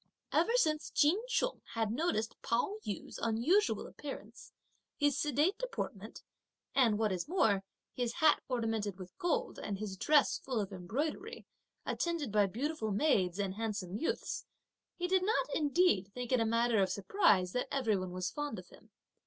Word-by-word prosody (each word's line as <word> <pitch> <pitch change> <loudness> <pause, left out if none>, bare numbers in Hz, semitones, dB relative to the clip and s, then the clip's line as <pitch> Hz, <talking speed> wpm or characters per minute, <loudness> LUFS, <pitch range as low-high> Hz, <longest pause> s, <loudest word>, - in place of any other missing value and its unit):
Ever 460 - +3
since 310 -10 +2
Ch'in 315 +7 +3
Chung - - 0
had 225 -2 0
noticed 235 -5 -1
Pao 245 - 0
yü's 205 - -5
unusual 260 - +2
appearance, 245 -6 -9 0.5
his 290 -1 +2
sedate 300 - +1
deportment, - - -5 0.5
and 235 -6 +4
what 215 -1 +1
is 185 +4 -2
more, 220 - +2 0.3
his 240 -2 -2
hat 315 - +4
ornamented 225 -5 -1
with 185 -1 -10
gold, 470 +8 -1
and 200 -2 -3
his 195 -2 -5
dress 295 +8 +3
full 255 -4 -2
of 200 -1 -3
embroidery, 295 - -4 0.4
attended 335 -8 -1
by 205 -1 +4
beautiful 250 - -2
maids 200 - +2
and 200 -2 -1
handsome 205 -4 -3
youths, 245 - -2 0.5
he 355 0 -2
did 375 0 +3
not 435 +5 +2
indeed 290 - +2
think 250 0 -5
it 255 - +4
a 225 - +2
matter 230 -1 +2
of 190 - +2
surprise 200 - +2
that 250 +5 -1
every 245 -6 +1
one 185 -1 -3
was 180 0 -3
fond 295 -6 -4
of 180 -1 -10
him. 220 - -18
235 Hz, 160 wpm, -33 LUFS, 205-310 Hz, 0.5 s, and